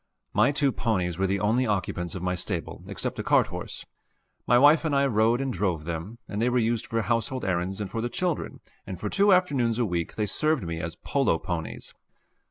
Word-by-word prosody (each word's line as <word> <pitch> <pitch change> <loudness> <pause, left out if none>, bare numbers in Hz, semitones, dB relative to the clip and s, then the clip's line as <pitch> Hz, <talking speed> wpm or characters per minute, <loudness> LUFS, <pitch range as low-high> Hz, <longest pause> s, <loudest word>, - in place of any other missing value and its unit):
My 145 - +4
two 140 -1 +2
ponies 95 -8 -1
were 95 - +2
the 100 +1 0
only 115 +5 +2
occupants 95 -4 -2
of 90 - -5
my 90 0 0
stable 90 - -4
except - - -3
a - - -2
cart - - +4
horse. - - -6 0.6
My 120 - +5
wife 145 +5 +6
and 155 -3 0
I 140 0 +4
rode 115 -1 +3
and 135 -2 -2
drove 90 -5 -1
them, 85 +7 -5
and 105 +1 -3
they 120 - +3
were 125 - +1
used 115 -1 0
for 115 -1 -1
household 120 +3 -1
errands 95 +1 -1
and 105 - -3
for 115 - -4
the 120 - -2
children, 175 +6 -2 0.3
and 95 - -6
for 105 - -3
two 200 +1 +4
afternoons 140 - +3
a 120 - +2
week 85 -4 -2
they 105 - 0
served 155 +6 0
me 85 -1 -4
as 85 0 -4
polo 135 -11 +1
ponies. 85 -2 -5
110 Hz, 215 wpm, -26 LUFS, 90-130 Hz, 0.6 s, wife